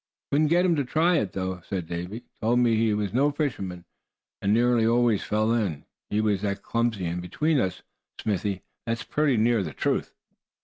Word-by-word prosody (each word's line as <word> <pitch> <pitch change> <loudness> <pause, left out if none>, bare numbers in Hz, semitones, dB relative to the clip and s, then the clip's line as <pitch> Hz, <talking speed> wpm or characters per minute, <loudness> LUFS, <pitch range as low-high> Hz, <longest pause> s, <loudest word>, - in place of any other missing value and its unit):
"Couldn't 150 +2 +3
get 175 +4 +3
him 175 -2 +3
to 145 - +1
try 160 +6 +2
it, 100 -10 -1
though," 95 -1 -3
said 95 -3 -4
Davy. 90 +7 -5 0.2
"Told 120 +2 +2
me 120 -2 +4
he 110 0 +2
was 105 -1 -1
no 140 +4 +3
fisherman, 100 - -3 0.6
and 100 - +1
nearly 120 +1 +3
always 115 -2 +3
fell 110 +2 +1
in, 90 -11 -1 0.2
he 105 - 0
was 105 -3 +1
that 100 -2 -2
clumsy. 115 -5 0
And 85 +1 -2
between 150 - 0
us, 95 -6 -2 0.4
Smithy, 100 -2 -2 0.2
that's 115 0 -1
pretty 145 -5 +1
near 115 0 +3
the 80 -6 -4
truth." - - -1
110 Hz, 185 wpm, -26 LUFS, 95-125 Hz, 0.6 s, me